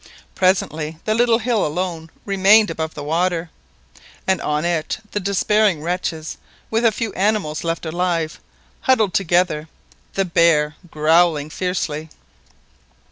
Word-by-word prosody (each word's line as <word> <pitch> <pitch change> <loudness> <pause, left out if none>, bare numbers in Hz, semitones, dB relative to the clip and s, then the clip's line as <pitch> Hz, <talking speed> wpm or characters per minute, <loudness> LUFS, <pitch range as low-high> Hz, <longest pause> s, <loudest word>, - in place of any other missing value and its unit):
Presently 160 -4 0
the 215 - +1
little 235 0 +3
hill 230 -2 0
alone 165 0 -3 0.2
remained 200 +2 +5
above 160 -1 -4
water, 165 +3 -1 0.7
and 190 -2 +1
on 150 +2 -1
it 170 -3 -1
the 205 - -1
despairing 200 -3 +1
wretches, 165 -2 -3 0.3
with 225 +1 +1
the 230 -2 +4
few 215 -1 -3
animals 195 -6 0
left 165 0 -2
alive, 165 -1 -1 0.4
huddled 220 -8 +2
together, 175 -4 +1 0.5
the 195 - 0
bear 165 -3 +3
growling 155 -1 +2
fiercely. 160 -4 -3
175 Hz, 120 wpm, -20 LUFS, 160-200 Hz, 0.7 s, remained